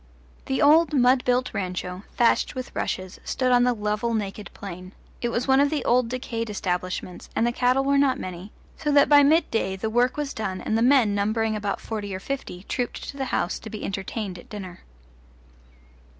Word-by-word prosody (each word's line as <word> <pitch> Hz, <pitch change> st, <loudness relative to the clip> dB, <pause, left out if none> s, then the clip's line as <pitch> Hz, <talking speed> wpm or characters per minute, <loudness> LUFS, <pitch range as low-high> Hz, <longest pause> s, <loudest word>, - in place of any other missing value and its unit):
The 265 Hz, -, +1 dB
old 310 Hz, +2 st, +5 dB
mud 250 Hz, 0 st, +4 dB
built 250 Hz, +1 st, +1 dB
rancho, 180 Hz, -1 st, -4 dB, 0.2 s
thatched 235 Hz, -1 st, +3 dB
with 255 Hz, -1 st, -6 dB
rushes, 185 Hz, 0 st, -3 dB
stood 255 Hz, -1 st, 0 dB
on 245 Hz, 0 st, +5 dB
the 250 Hz, -, +3 dB
level 210 Hz, +2 st, -1 dB
naked 205 Hz, -1 st, -4 dB
plain; 185 Hz, -1 st, -9 dB, 0.3 s
it 240 Hz, -, 0 dB
was 235 Hz, +2 st, -1 dB
one 265 Hz, 0 st, +5 dB
of 285 Hz, 0 st, +4 dB
the 295 Hz, -4 st, -2 dB
old 245 Hz, -1 st, +3 dB
decayed 230 Hz, -3 st, -4 dB
establishments, 185 Hz, -2 st, -3 dB
and 230 Hz, -, +2 dB
the 240 Hz, -, +2 dB
cattle 250 Hz, +2 st, +2 dB
were 280 Hz, 0 st, +3 dB
not 275 Hz, -2 st, +3 dB
many, 185 Hz, +3 st, -7 dB, 0.3 s
so 300 Hz, -2 st, -1 dB
that 285 Hz, -1 st, +5 dB
by 290 Hz, -1 st, +8 dB
midday 280 Hz, -, +2 dB
the 220 Hz, +3 st, -3 dB
work 245 Hz, +4 st, +2 dB
was 295 Hz, -2 st, -2 dB
done 195 Hz, -4 st, -3 dB
and 220 Hz, -, -2 dB
the 225 Hz, -, +2 dB
men, 245 Hz, -4 st, +4 dB
numbering 215 Hz, +2 st, 0 dB
about 205 Hz, -1 st, -2 dB
forty 205 Hz, -3 st, -5 dB
or -, -, -5 dB
fifty, 195 Hz, -6 st, -5 dB
trooped 245 Hz, +3 st, -4 dB
to 280 Hz, -, -8 dB
the 270 Hz, -, -2 dB
house 175 Hz, -8 st, -1 dB
to 220 Hz, -, -9 dB
be 215 Hz, -1 st, -6 dB
entertained 195 Hz, -1 st, -4 dB
at -, -, -15 dB
dinner. 190 Hz, -4 st, -8 dB
230 Hz, 195 wpm, -25 LUFS, 200-255 Hz, 0.3 s, by